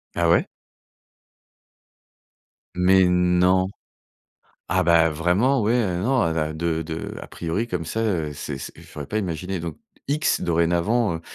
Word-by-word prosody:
Ah - - +2
ouais? - - +3 2.3
Mais 95 +1 +4
non! 90 +1 +3 1.0
Ah 95 0 +2
bah, 85 -1 +4
vraiment, 95 - +2
ouais, 110 +3 +2
heu, 95 -8 0
non, 130 +2 +2
a 85 -1 +1
da 80 -1 -1
de 80 0 -2
de 80 +1 -6
a - - -8
priori 85 +8 -3
comme 85 -4 -3
ça, 110 +7 -3
heu, 85 -9 -1
c'est 70 -1 -6
se - - -7
je - - -15
l'aurais 75 -2 -6
pas 110 - -2
imaginé 90 -1 -3
donc 85 -3 -6 0.3
X, 150 +2 +1
dorénavant, 85 +5 +1
heu - - -8
90 Hz, 155 wpm, -23 LUFS, 80-100 Hz, 2.3 s, Mais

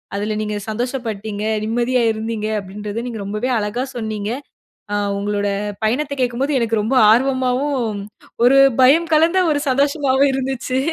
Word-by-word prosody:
அதில 210 +2 -2
நீங்க 210 0 -3
சந்தோஷப்பட்டீங்க. 220 -3 -4 0.2
நிம்மதியா 240 +2 +1
இருந்தீங்க, 220 0 -3
அப்டின்றத 205 +3 -6
நீங்க 230 -3 -5
ரொம்பவே 215 +5 -2
அழகா 210 +4 -2
சொன்னீங்க. 215 -2 -3 0.6
ஆ - - +1 0.2
உங்களோட 205 0 -1 0.4
பயணத்தை 275 +7 0
கேட்கும்போது 255 +3 0
எனக்கு 225 -2 0
ரொம்ப 225 +6 -1 0.2
ஆர்வமாவும், 255 -1 +1 0.5
ஒரு 255 +3 +6 0.2
பயம் 315 +6 +5
கலந்த 330 +4 +4
ஒரு 290 -1 0
சந்தோஷமாவும் 280 0 +2
இருந்துச்சு. 260 -1 -2
240 Hz, 125 wpm, -19 LUFS, 215-265 Hz, 0.6 s, ஒரு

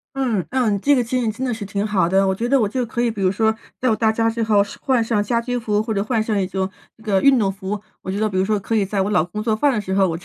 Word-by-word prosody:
嗯， 240 -9 0
嗯， 230 -6 +1
这 285 +5 +3
个 245 - +1
情 250 +2 -1
景 225 - 0
真 255 +5 -4
的 245 - -1
是 220 -2 -6
挺 200 +1 -2
好 190 -5 +1
的。 195 +1 +3
我 190 - +1
觉 235 +5 -2
得， 275 -1 +3
我 210 - +2
就 250 +2 -1
可 235 +1 -4
以 240 - +2
比 200 -3 -5
如 185 - +3
说， 220 +3 +2 0.3
等 255 - 0
到 - - +3
到 220 0 +2
家 225 +1 +1
之 230 0 -2
后 215 -2 +3 0.2
换 255 -3 +2
上 220 -2 +1
家 230 +3 0
居 245 +1 -3
服， 210 -3 0
或 220 0 -2
者 200 - 0
换 220 +1 0
上 215 -2 0
一 190 - +1
种 190 0 -2 0.3
那 220 - -20
个 195 -4 +2
运 275 -2 +5
动 200 -4 +1
服， 195 +1 -5 0.2
我 190 - -5
觉 200 - -3
得 215 - +1
比 190 - -4
如 190 - +2
说， 210 0 +1
可 210 +3 -3
以 210 -3 +3
在 195 0 -2
我 200 - -1
老 165 -6 +3
公 195 +5 -6
做 220 0 0
饭 275 +6 +2
的 215 - 0
时 190 -2 -3
候， 195 -2 +3
我 165 0 -3
就 - - -17
215 Hz, 370 characters per minute, -21 LUFS, 195-235 Hz, 0.3 s, 运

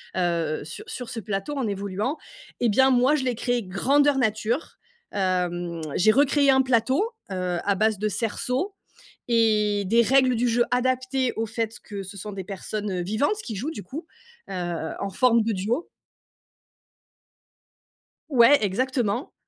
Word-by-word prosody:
heu, 170 -3 0
sur 160 +2 -9
sur 250 -2 -6
ce 235 - -5
plateau 205 +7 -3
en 255 - -1
évoluant 200 +7 -2 0.4
et 240 - +3
bien, 265 +6 +4
moi, 255 +3 +4
je 265 -3 -1
l'ai 250 -2 0
créé 245 +1 -1
grandeur 275 +10 +2
nature, 220 +3 -1 0.3
hem, 175 -3 -1
j'ai 215 +4 +5
recréé 280 +2 +4
un 265 0 +5
plateau, 260 - +2 0.3
heu, 180 -2 -2
à 200 - +2
base 215 +1 +2
de 215 - 0
cerceaux 250 - -2 0.5
et 210 -3 +2
des 230 +5 +4
règles 260 +2 +4
du 240 +1 +1
jeu 240 +1 +3
adaptées 255 0 +1
au 225 - -1
fait 225 0 -3
que 200 -2 -6
ce 195 +2 -10
sont 210 +2 -7
des 195 -1 -5
personnes, 205 +2 -5
heu, 180 -2 -2
vivantes, 220 - 0
qui 225 - -5
jouent 245 +10 -3
du 205 - -7
coup, 305 - -7 0.4
heu, 175 -3 -3
en 200 - -3
forme 235 +3 +3
de 225 +1 0
duo. 220 - -2 2.4
Ouais, 265 0 +6
exactement. 240 +3 -1
225 Hz, 155 wpm, -25 LUFS, 195-255 Hz, 2.4 s, Ouais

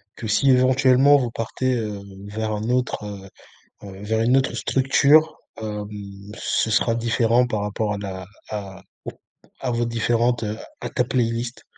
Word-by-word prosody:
Que 110 - -6
si, 120 +7 +2
éventuellement, 130 +2 +5
vous 125 -4 -1
partez, 125 +3 -2
heu, 105 -4 -3 0.3
vers 110 +1 -3
un 105 +2 -3
autre, 125 -3 0
heu 100 -1 -8 0.6
heu 95 0 -10
vers 110 +1 0
une 125 +3 +3
autre 135 - +1
structure, 140 +4 +3 0.2
hem, 105 -1 -4 0.5
ce 110 - 0
sera 115 +1 +2
différent 115 +1 +2
par 110 -3 -2
rapport 105 0 -2
à - - -5
la 95 -2 -6 0.2
à 95 -3 -6 0.2
aux - - -4 0.5
à 130 - -2
vos 120 0 0
différentes, 120 +1 +1
heu 105 +1 -3 0.2
à - - -4
ta - - 0
playlist? 120 0 -2
115 Hz, 165 wpm, -22 LUFS, 105-125 Hz, 0.6 s, éventuellement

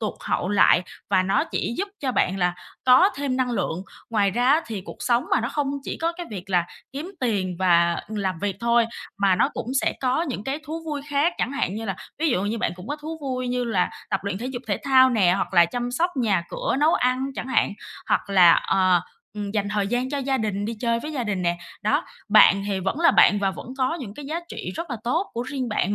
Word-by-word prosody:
tụt 215 - -2
hậu 180 - -1
lại 200 -3 +5 0.3
và 190 -1 +4
nó 195 +1 +1
chỉ 235 - -3
giúp 400 +2 -1
cho 260 -3 -1
bạn 190 -3 +1
là 180 -1 +1 0.3
có 260 +9 +7
thêm 275 -2 -1
năng 255 -1 0
lượng. 185 -6 -2 0.3
Ngoài 205 -3 +2
ra 245 +5 0
á 305 +4 +5
thì 215 -4 -4
cuộc - - -9
sống 240 0 +2
mà, - - +3
nó 235 - -2
không 290 -2 -1
chỉ - - -5
có 330 +1 0
cái 350 - -6
việc 195 -1 -7
là 175 -2 +3 0.3
kiếm 310 +7 -5
tiền 195 -8 -1
và 170 -2 +3
làm 195 -5 -2
việc 195 +1 -2
thôi, 235 0 +3 0.3
mà 195 -2 +4
nó - - +3
cũng 245 -4 -6
sẽ - - +1
có 260 +5 +1
những 255 -10 -4
cái 270 +2 -2
thú 325 +2 -5
vui 295 -3 -4
khác, 290 +4 +2
chẳng 260 - -1
hạn 240 -9 -1
như 225 - -4
là 195 -3 -3 0.2
ví 320 - +1
dụ 195 -9 +1
như 215 +3 -2
bạn 175 - -1
cũng 180 +5 -11
có 290 - -2
thú 315 +2 -7
vui 255 -3 -3
như 250 0 -1
là 200 -6 0 0.2
tập 195 - 0
luyện 200 -1 -2
thể 240 - -4
dục 255 -1 -5
thể 200 - -1
thao 260 -1 +6
nè, 195 -7 +3
hoặc 195 - -3
là 175 - +7
chăm 245 +7 -3
sóc 340 +8 +1
nhà 205 -8 +1
cửa, - - -1
nấu 315 +3 +4
ăn 255 +1 +1
chẳng 260 - -4
hạn, 235 - +2 0.4
hoặc 200 - 0
là, 180 -3 +7
ờ, 185 -2 +3 0.4
ừm, 205 -1 -3
dành 205 -1 -1
thời 205 -1 0
gian 245 +4 -1
cho 285 - -1
gia 270 0 0
đình, 205 -2 -2
đi 230 +2 -3
chơi 235 -1 +1
với 305 +4 -6
gia 255 -5 -2
đình 195 -4 -2
nè. 170 0 +1 0.3
Đó, 215 +1 +1 0.2
bạn 205 -2 +6
thì 195 -2 -1
vẫn 195 - -2
là 335 - +6
bạn 205 - +5
và 195 -1 +1
vẫn 190 - -9
có 260 +4 +1
những 210 -6 -7
cái 290 - -9
giá 320 +4 -3
trị - - -6
rất 335 - -5
là 240 - -2
tốt 325 +11 0
của 235 - -2
riêng 260 -2 -4
bạn. 205 -1 0
235 Hz, 255 wpm, -24 LUFS, 195-270 Hz, 0.4 s, có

